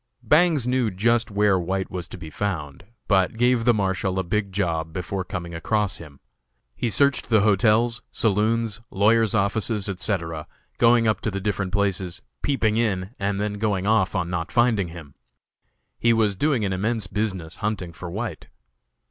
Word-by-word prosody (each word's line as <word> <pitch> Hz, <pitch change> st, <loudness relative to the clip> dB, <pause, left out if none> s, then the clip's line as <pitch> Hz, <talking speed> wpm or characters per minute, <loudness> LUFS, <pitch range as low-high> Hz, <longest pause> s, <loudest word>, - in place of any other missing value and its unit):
Bangs 155 Hz, -5 st, +3 dB
knew 125 Hz, -2 st, +1 dB
just 115 Hz, +4 st, +1 dB
where 100 Hz, -2 st, +2 dB
White 95 Hz, +2 st, -2 dB
was 90 Hz, -2 st, -4 dB
to -, -, -9 dB
be 80 Hz, -3 st, -9 dB
found, 80 Hz, -5 st, -4 dB, 0.2 s
but 95 Hz, +2 st, +2 dB
gave 120 Hz, -1 st, +2 dB
the 120 Hz, -, +6 dB
Marshal 95 Hz, -1 st, -1 dB
a 95 Hz, -, +1 dB
big 100 Hz, +2 st, -1 dB
job 85 Hz, -5 st, -1 dB
before 95 Hz, +2 st, -3 dB
coming 85 Hz, -1 st, -6 dB
across 105 Hz, +4 st, -1 dB
him. 75 Hz, -4 st, -12 dB, 0.6 s
He 115 Hz, -, -1 dB
searched 140 Hz, +5 st, +2 dB
the 110 Hz, -3 st, +4 dB
hotels, 110 Hz, +4 st, +3 dB
saloons, 110 Hz, +1 st, 0 dB
lawyers' 110 Hz, +2 st, +3 dB
offices, 105 Hz, 0 st, 0 dB
etc., 85 Hz, -5 st, -3 dB, 0.3 s
going 115 Hz, -1 st, +5 dB
up 110 Hz, -, +1 dB
to -, -, -1 dB
the 100 Hz, -1 st, -3 dB
different 95 Hz, -1 st, -2 dB
places, 95 Hz, -3 st, -1 dB, 0.2 s
peeping 110 Hz, -6 st, +1 dB
in, 100 Hz, -4 st, 0 dB
and 100 Hz, 0 st, -1 dB
then 105 Hz, 0 st, -2 dB
going 100 Hz, -3 st, 0 dB
off 110 Hz, 0 st, +2 dB
on 90 Hz, -2 st, 0 dB
not 85 Hz, -2 st, -3 dB
finding 120 Hz, -6 st, +2 dB
him. 80 Hz, -4 st, -11 dB, 0.9 s
He 115 Hz, 0 st, +4 dB
was 110 Hz, -3 st, +2 dB
doing 130 Hz, -1 st, +1 dB
an 95 Hz, -, -1 dB
immense 110 Hz, +3 st, -1 dB
business 95 Hz, -4 st, -3 dB
hunting 100 Hz, -5 st, -3 dB
for 90 Hz, +3 st, -8 dB
White. 100 Hz, -, -5 dB
100 Hz, 165 wpm, -24 LUFS, 90-110 Hz, 0.9 s, the